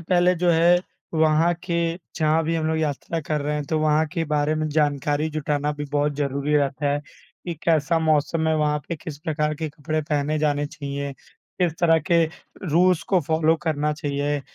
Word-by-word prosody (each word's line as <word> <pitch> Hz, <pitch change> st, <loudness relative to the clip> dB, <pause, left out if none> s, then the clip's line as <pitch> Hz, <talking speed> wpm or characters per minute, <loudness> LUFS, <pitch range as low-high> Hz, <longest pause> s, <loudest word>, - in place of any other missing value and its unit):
पहले 180 Hz, +1 st, +3 dB
जो 175 Hz, +1 st, +2 dB
है 170 Hz, +2 st, +5 dB, 0.4 s
वहाँ 160 Hz, +2 st, +3 dB
के 175 Hz, -, -2 dB, 0.4 s
जहाँ 160 Hz, 0 st, +2 dB
भी 165 Hz, +1 st, 0 dB
हम 155 Hz, -, -1 dB
लोग 160 Hz, 0 st, 0 dB
यात्रा 155 Hz, +2 st, -2 dB
कर 150 Hz, 0 st, -2 dB
रहे 150 Hz, +1 st, -1 dB
हैं, 150 Hz, -1 st, -2 dB
तो 155 Hz, +2 st, -1 dB
वहाँ 155 Hz, +1 st, +2 dB
के 165 Hz, -, -1 dB
बारे 150 Hz, 0 st, 0 dB
में 155 Hz, 0 st, -1 dB
जानकारी 145 Hz, 0 st, +1 dB
जुटाना 150 Hz, -1 st, -1 dB
भी 145 Hz, 0 st, -5 dB
बहुत 145 Hz, 0 st, +1 dB
ज़रूरी 140 Hz, +1 st, -1 dB
रहता 140 Hz, 0 st, 0 dB
है, 145 Hz, -, -1 dB
कि 170 Hz, +3 st, -10 dB
कैसा 165 Hz, 0 st, +2 dB
मौसम 160 Hz, 0 st, +1 dB
है 160 Hz, -, +2 dB
वहाँ 150 Hz, -1 st, +1 dB
पे? 170 Hz, -, -3 dB
किस 150 Hz, -1 st, -8 dB
प्रकार 150 Hz, 0 st, -1 dB
के 155 Hz, +1 st, -4 dB
कपड़े 155 Hz, +1 st, -3 dB
पहने 150 Hz, 0 st, -1 dB
जाने 145 Hz, -1 st, +1 dB
चाहिए? 140 Hz, -1 st, -5 dB, 0.5 s
किस 175 Hz, -3 st, +2 dB
तरह 165 Hz, -2 st, +5 dB
के 170 Hz, -1 st, +5 dB, 0.5 s
रूल्स 175 Hz, +1 st, +4 dB
को 185 Hz, -, +5 dB
फॉलो 160 Hz, 0 st, +3 dB
करना 150 Hz, -2 st, 0 dB
चाहिए? 145 Hz, -1 st, -2 dB
155 Hz, 190 wpm, -23 LUFS, 145-160 Hz, 0.5 s, है